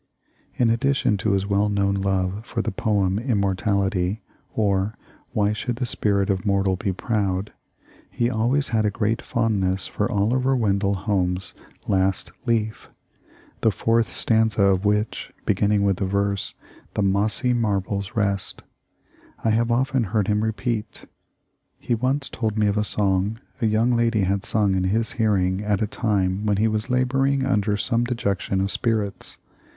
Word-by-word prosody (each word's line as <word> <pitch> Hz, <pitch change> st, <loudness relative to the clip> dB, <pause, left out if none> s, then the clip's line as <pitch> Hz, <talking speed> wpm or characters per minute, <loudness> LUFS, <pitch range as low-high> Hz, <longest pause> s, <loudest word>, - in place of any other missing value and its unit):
In 120 Hz, -2 st, +3 dB
addition 130 Hz, -2 st, +1 dB
to 100 Hz, +1 st, 0 dB
his 95 Hz, 0 st, +1 dB
well 100 Hz, +1 st, +1 dB
known 100 Hz, -1 st, +1 dB
love 95 Hz, +1 st, -1 dB
for -, -, -3 dB
the -, -, -2 dB
poem 100 Hz, -1 st, 0 dB
"Immortality" 100 Hz, -3 st, 0 dB, 0.3 s
or 100 Hz, -1 st, 0 dB, 0.4 s
"Why 105 Hz, 0 st, +1 dB
should 120 Hz, +3 st, -3 dB
the 125 Hz, +1 st, -2 dB
Spirit 100 Hz, -4 st, +1 dB
of 95 Hz, -2 st, -2 dB
Mortal 100 Hz, -1 st, +1 dB
be 95 Hz, +2 st, -2 dB
Proud," 100 Hz, -1 st, -2 dB, 0.6 s
he 120 Hz, -, 0 dB
always 125 Hz, +5 st, +1 dB
had 110 Hz, -2 st, +1 dB
a 105 Hz, -, +2 dB
great 110 Hz, +2 st, -1 dB
fondness 100 Hz, -5 st, 0 dB
for 105 Hz, +3 st, -2 dB
Oliver 125 Hz, +6 st, +2 dB
Wendell 100 Hz, -4 st, +1 dB
Holmes' 95 Hz, -2 st, -1 dB, 0.3 s
"Last 95 Hz, -2 st, +1 dB, 0.2 s
Leaf," 110 Hz, -2 st, -1 dB, 0.7 s
the 110 Hz, -, +3 dB
fourth 115 Hz, +2 st, +1 dB
stanza 110 Hz, -2 st, +2 dB
of 95 Hz, 0 st, +3 dB
which, 105 Hz, +1 st, 0 dB
beginning 105 Hz, 0 st, +2 dB
with 100 Hz, -2 st, +2 dB
the 100 Hz, -, -1 dB
verse, 100 Hz, 0 st, -1 dB, 0.4 s
"The 105 Hz, -, +1 dB
mossy 100 Hz, +5 st, +1 dB
marbles 100 Hz, -2 st, -1 dB
rest," 100 Hz, -3 st, -1 dB, 0.8 s
I 110 Hz, -, +2 dB
have 115 Hz, +2 st, +1 dB
often 130 Hz, 0 st, +1 dB
heard 105 Hz, 0 st, 0 dB
him 105 Hz, 0 st, +1 dB
repeat. 110 Hz, 0 st, -3 dB, 0.7 s
He -, -, -2 dB
once 130 Hz, +4 st, +1 dB
told 110 Hz, -2 st, -3 dB
me 105 Hz, -, +3 dB
of 100 Hz, -1 st, +1 dB
a 105 Hz, -, +1 dB
song 100 Hz, +1 st, 0 dB, 0.2 s
a 115 Hz, -, +3 dB
young 110 Hz, +3 st, +2 dB
lady 115 Hz, -2 st, +2 dB
had 95 Hz, +1 st, 0 dB
sung 105 Hz, -3 st, +2 dB
in 95 Hz, -1 st, +1 dB
his 110 Hz, +4 st, 0 dB
hearing 100 Hz, -6 st, +1 dB
at 105 Hz, -2 st, +1 dB
a -, -, +1 dB
time 105 Hz, -2 st, -1 dB
when 105 Hz, -1 st, +2 dB
he 110 Hz, +2 st, +3 dB
was 110 Hz, 0 st, -2 dB
laboring 130 Hz, +2 st, +1 dB
under 105 Hz, -5 st, +1 dB
some 115 Hz, +2 st, 0 dB
dejection 100 Hz, -5 st, -1 dB
of 100 Hz, +1 st, -1 dB
spirits. 110 Hz, -4 st, -1 dB
105 Hz, 155 wpm, -23 LUFS, 100-115 Hz, 0.8 s, In